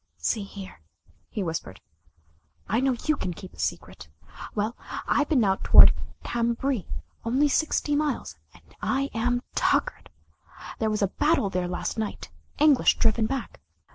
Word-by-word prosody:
"See 85 - -1
here," 195 - -9 0.5
he 205 - -3
whispered, 160 - -5 0.9
"I 225 - +1
know 265 -1 +2
you 310 - +2
can 180 -9 -4
keep 185 0 -11
a - - -18
secret. 75 0 -4 0.5
Well, 215 +2 -1 0.3
I've 290 0 +2
been 265 -7 +3
out 195 -1 +1
toward - - +9 0.3
Cambrai 235 -1 -1 0.4
only 260 +6 +2
sixty 295 0 +1
miles 300 -1 -1 0.2
and - - -20 0.2
I 275 +1 0
am 245 +2 0
tuckered. - - 0 0.7
There 220 - +1
was 215 -1 0
a - - +3
battle 295 -10 +2
there 180 -1 -1
last 180 +5 -3
night 220 - -5 0.3
English 295 -3 +4
driven 220 -1 +2
back. 270 -1 -5
230 Hz, 145 wpm, -26 LUFS, 195-270 Hz, 0.9 s, toward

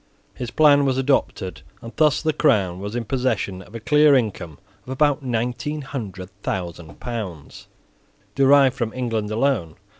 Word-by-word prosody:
His 125 - -6
plan 145 +1 +5
was 135 -2 +1
adopted; 130 - -1 0.2
and 115 - -10
thus 150 -1 +3
the 155 -1 +1
Crown 100 - +2
was 100 +3 -6
in 120 -1 -2
possession 115 -7 -1
of 105 +5 -14
a - - -4
clear 150 +5 +5
income 100 - -2 0.3
of - - -15
about 145 +2 +1
nineteen 125 +4 -3
hundred 100 -9 -7
thousand 85 -5 -5
pounds, 100 -11 -7 0.7
derived 135 +1 +5
from 120 -4 -3
England 115 -4 -2
alone. 110 - 0
120 Hz, 150 wpm, -22 LUFS, 100-140 Hz, 0.7 s, plan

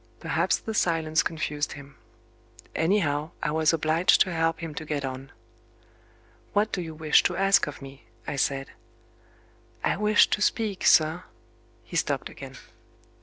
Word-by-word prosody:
Perhaps - - 0
the 220 - -6
silence 160 -5 +1
confused 150 -2 -3
him. 140 -1 -12 0.8
Anyhow, 160 -4 +1
I 150 - 0
was 155 0 +2
obliged 165 +2 +3
to 185 - +2
help 165 0 0
him 165 -2 -6
to 155 - -6
get 150 -3 -3
on. 135 +1 -7 1.2
"What 210 +1 +1
do 180 - -2
you 160 -2 -7
wish 155 -1 +4
to 180 - -1
ask 195 -3 +3
of 145 -1 -8
me?" 135 0 -12 0.2
I - - -4
said. 135 +1 -1 1.1
"I - - +1
wished 210 +1 +4
to 205 - -1
speak, 210 -3 0
sir 160 +3 +4 0.3
" 115 0 -34
He 115 - -10
stopped 140 -4 -1
again. 135 -1 -10
155 Hz, 155 wpm, -26 LUFS, 140-175 Hz, 1.2 s, wish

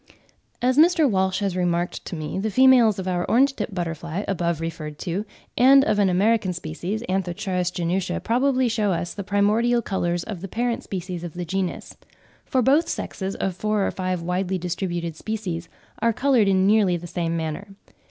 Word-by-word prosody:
As 255 +3 +3
Mr. 330 -1 +5
Walsh 190 -3 +1
has 195 -3 -1
remarked 175 -1 -1
to - - -5
me, 155 +3 -4
the 215 +3 -1
females 245 -2 +5
of 190 -1 -4
our 175 -1 0
orange 275 +3 +4
tip - - -4
butterfly, 170 0 -4
above 170 -4 -1
referred 160 -2 -5
to, 185 +5 -3 0.3
and 270 +2 +6
of 210 - +1
an 200 -2 +4
American 195 +1 +2
species 175 +6 -4
(Anth. 185 -1 -1
genutia) 180 -1 -1
probably 255 +5 +1
shew 215 -3 0
us 175 -1 -2
the 200 - -5
primordial 215 +5 +2
colours 175 -3 -1
of 195 -6 -7
the 195 - -5
parent 235 +4 -1
species 180 -2 -5
of 175 -2 -7
the 175 0 -4
genus; 185 +2 -3 0.5
for 260 -3 +1
both 290 +7 +3
sexes 190 0 -4
of 190 -2 -2
four 210 0 0
or - - -1
five 185 -2 -3
widely 180 +2 -1
distributed 175 -2 -3
species 180 -4 -4 0.3
are 230 0 +3
coloured 250 -3 +3
in 190 -1 +3
nearly 200 -4 +3
the 175 - -9
same 170 -1 -2
manner. 160 +4 -4
190 Hz, 180 wpm, -23 LUFS, 175-220 Hz, 0.5 s, and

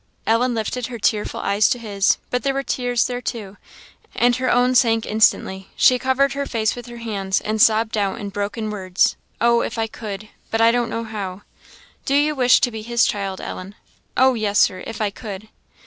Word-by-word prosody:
Ellen 235 +2 +2
lifted 230 +2 -3
her 245 -2 -7
tearful 210 -1 -1
eyes 200 +1 +2
to - - +1
his; 205 -4 +1
but 250 - 0
there 275 -1 -1
were 275 - -1
tears 245 -3 0
there 245 0 -3
too, 210 -6 -6 0.6
and 245 0 +3
her 255 0 -1
own 250 +1 +3
sank 230 -3 +3
instantly. 195 -3 +1
She 250 -1 +5
covered 265 +1 +1
her 280 0 -3
face 220 -2 0
with 245 0 -9
her 240 0 -9
hands, 200 -4 -2
and 215 0 -2
sobbed 225 -1 +4
out 200 -2 -1
in 205 - -5
broken 205 +2 -3
words 185 -2 +1 0.2
"Oh, 235 0 +3
if 230 - -4
I 225 - +1
could! 215 -1 -7 0.2
but 225 - -1
I 230 0 +6
don't 240 -1 0
know 230 0 -3
how." 200 -3 -6 0.6
"Do 275 - +1
you 295 +1 +3
wish 250 -3 +4
to 245 - +2
be 220 -1 -6
his 235 +1 +2
child, 195 -2 -2
Ellen?" 190 +2 -7 0.4
"Oh 260 0 +5
yes, 210 -3 -1
Sir 185 -3 +3
if 225 -1 -6
I 210 -2 0
could." 210 -1 -8
225 Hz, 205 wpm, -21 LUFS, 205-245 Hz, 0.6 s, I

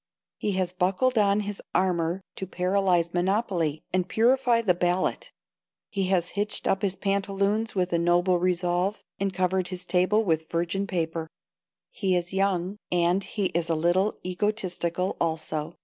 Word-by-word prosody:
He 205 - -1
has 185 -1 -1
buckled 190 +8 +1
on 205 -1 +3
his 205 -1 -5
armor 180 0 +1
to 190 - -5
paralyze 180 -2 +1
monopoly 175 -4 0
and 185 -1 0
purify 240 0 +3
the 190 -5 +4
ballot 175 +1 0 0.6
He 195 -2 0
has 185 -2 +1
hitched 205 +1 -2
up 195 - +1
his 195 -2 0
pantaloons 200 +2 0
with 180 -2 0
a 170 - +3
noble 175 +1 +3
resolve 180 +2 0 0.2
and 195 0 0
covered 185 0 0
his 185 -1 -7
table 185 +5 +2
with 160 -4 0
virgin 175 +4 -1
paper. 165 -3 -2 0.6
He 190 -3 0
is 175 +1 -2
young, 190 0 0
and 175 +2 +2
he 200 -2 -2
is 170 0 0
a 165 - +2
little 175 +6 +1
egotistical, 185 -2 -1
also. 160 -1 -2
185 Hz, 150 wpm, -26 LUFS, 175-200 Hz, 0.6 s, the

